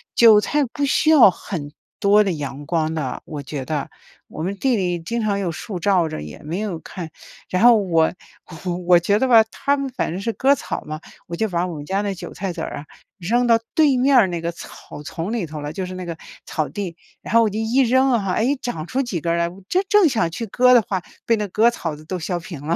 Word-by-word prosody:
韭 220 -3 +7
菜 295 +7 +1
不 285 +4 -2
需 295 +3 +2
要 285 -10 +8
很 150 -7 -6 0.3
多 205 +1 +5
的 195 - -1
阳 145 -2 -5
光 160 -1 0
的， 145 -5 -3
我 150 -3 -6
觉 135 -1 -6
得。 155 -2 -3 0.4
我 155 - -5
们 195 +3 -2
地 260 0 +2
里 180 -4 -1
经 230 +8 -3
常 200 -2 0
有 180 -3 -1
树 180 +3 -6
照 180 -2 +2
着 75 - -6
也 75 0 -9
没 165 +6 -4
有 205 -6 -3
看， 170 -4 -7 0.4
然 185 +3 0
后 240 -2 +8
我 165 -5 +2 0.7
我 175 -1 +7
觉 200 +4 +2
得 260 +4 +1
吧 225 -3 +7
他 280 +1 0
们 275 -1 -3
反 240 - -3
正 185 +3 -4
是 230 - -1
割 275 +2 +3
草 - - -4
嘛， 155 +1 -6 0.2
我 170 - -6
就 220 +4 -1
把 175 0 0
我 180 - -5
们 145 - -7
家 195 +6 -1
那 200 -1 -2
韭 185 - -8
菜 190 -1 -4
籽 165 - -6
儿 - - -5
啊， 145 - -8 0.3
扔 235 +7 +1
到 230 -1 +5
对 295 -5 +4
面 250 -5 +4
那 175 -1 -3
个 170 +1 -3
草 165 - -11
丛 165 +8 -5
里 210 -8 -2
头 150 -1 -7
了， 145 +1 -5
就 190 - -4
是 185 - -7
那 185 -1 -6
个 170 -1 -5 0.3
草 155 -2 -2
地， 195 -5 -5 0.3
然 - - -6
后 230 - +6
我 220 - +3
就 205 - -5
一 225 +4 +1
扔 260 +2 +3
啊， 195 -6 0
诶， 260 +6 +1
长 205 -12 -5
出 260 +10 -1
几 240 -10 -3
根 170 +1 -1
儿 - - +1
来， 170 0 0
我 185 +2 -14
这 370 - +2
正 415 -4 +6
想 220 - +1
去 200 +8 -5
割 250 +4 +4
的 240 - +7
话， 190 -2 -2 0.2
被 230 - +3
那 210 -1 -2
割 220 +5 +3
草 165 -9 -4
子 155 +1 -14
都 185 +2 -4
削 175 +2 -2
平 165 -4 -9
了。 165 +3 0
190 Hz, 270 characters per minute, -21 LUFS, 165-235 Hz, 0.7 s, 要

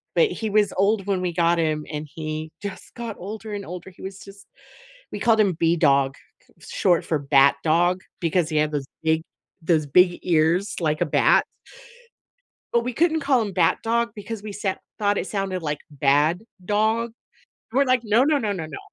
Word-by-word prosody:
But 470 -3 +4
he 225 - -4
was 210 0 +2
old 200 +1 +2
when 190 -2 0
we 180 -1 -2
got 170 0 +2
him 155 -2 0
and 150 0 -4
he 155 0 -5
just 200 -2 -8
got 230 -3 -5
older 215 +3 -7
and 200 -1 -5
older, 180 +2 -8
he 180 - -18
was 190 0 -7
just 200 0 -13 0.7
We - - -5
called 225 -2 +3
him 200 -4 +3
B-Dog, 140 -5 +3 0.4
c - - -15
short 175 -3 +2
for 155 -3 0
Bat 140 0 +4
Dog, 175 +3 +2 0.2
because 170 -1 0
he 155 - -1
had 150 0 +2
those 145 -3 -3 0.2
big 160 0 +2 0.4
those 160 -2 +2
big 175 +5 +4
ears 170 +4 +2
like 155 -2 0
a - - +3
bat - - +3 1.3
but 235 0 +3
we 250 - -3
couldn't 320 +3 +2
call 275 -3 +2
him 205 -3 -3
Bat 170 -3 +2
Dog 235 +1 0
because 215 +1 -6
we 215 - -6
set 195 -2 -3 0.2
thought 205 -1 +1
it - - -2
sounded 195 -3 -2
like 150 -2 -3
"bad 145 +6 +2 0.2
dog." 220 +3 +1 0.6
We - - -5
were 280 - +5
like, 255 -1 +3
"No, 220 +4 +4
no, 300 0 +3
no, 215 -6 -1
no, 170 -5 -4
no." 155 - -8
185 Hz, 195 wpm, -23 LUFS, 160-215 Hz, 1.3 s, were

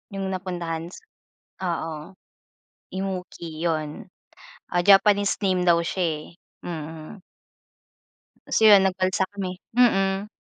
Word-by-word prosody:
Yung 195 -1 -3
napuntahan, 175 -3 -4
s 185 - -12 0.6
oo. 165 -1 -4 0.8
Immuki, 180 -4 -5
yun. 155 -2 -3 0.7
Ah, 175 - +2
Japanese 200 +1 +5
name 185 -2 +1
daw 170 0 +4
siya 165 -4 -2
eh. 175 - -31
Mm. 160 +3 -7 1.3
So 220 - +2
yun 200 -2 +8
nag-balsa 185 0 +1
kami, 185 -2 -5 0.2
mm. 195 -4 +3
185 Hz, 105 wpm, -24 LUFS, 165-195 Hz, 1.3 s, yun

